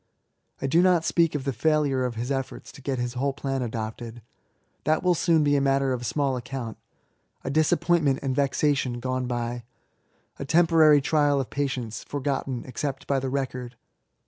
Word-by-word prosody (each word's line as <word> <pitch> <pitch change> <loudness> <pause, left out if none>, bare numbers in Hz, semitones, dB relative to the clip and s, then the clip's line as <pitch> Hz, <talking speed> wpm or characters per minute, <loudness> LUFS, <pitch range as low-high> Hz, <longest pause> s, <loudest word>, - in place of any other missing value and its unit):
I - - -3
do 160 +6 +4
not 180 -3 +3
speak 165 -3 +2
of 145 - -2
the 135 -1 -2
failure 145 0 +1
of 125 -2 -3
his 120 +4 -3
efforts 135 -1 -4
to - - -14
get 135 0 -2
his 120 0 -2
whole 135 +2 -1
plan 135 -1 -3
adopted. 115 0 -5 0.6
That 155 +2 +1
will 180 -1 +4
soon 165 -2 +3
be 145 0 +3
a 140 - +2
matter 135 -1 +2
of 120 -1 -3
small 140 +1 0
account 120 -2 -6 0.3
— - - -44
a 135 - -3
disappointment 155 -1 +2
and 130 -2 -1
vexation 140 -3 +1
gone 130 0 -2
by 120 0 -3 0.4
— - - -39
a - - -3
temporary 160 -1 +5
trial 145 -1 +2
of 135 - -4
patience, 130 -5 -3
forgotten 135 -3 -3
except 135 +2 -4
by 140 -1 +1
the 130 0 -3
record. 125 -2 -3
135 Hz, 180 wpm, -26 LUFS, 125-150 Hz, 0.6 s, temporary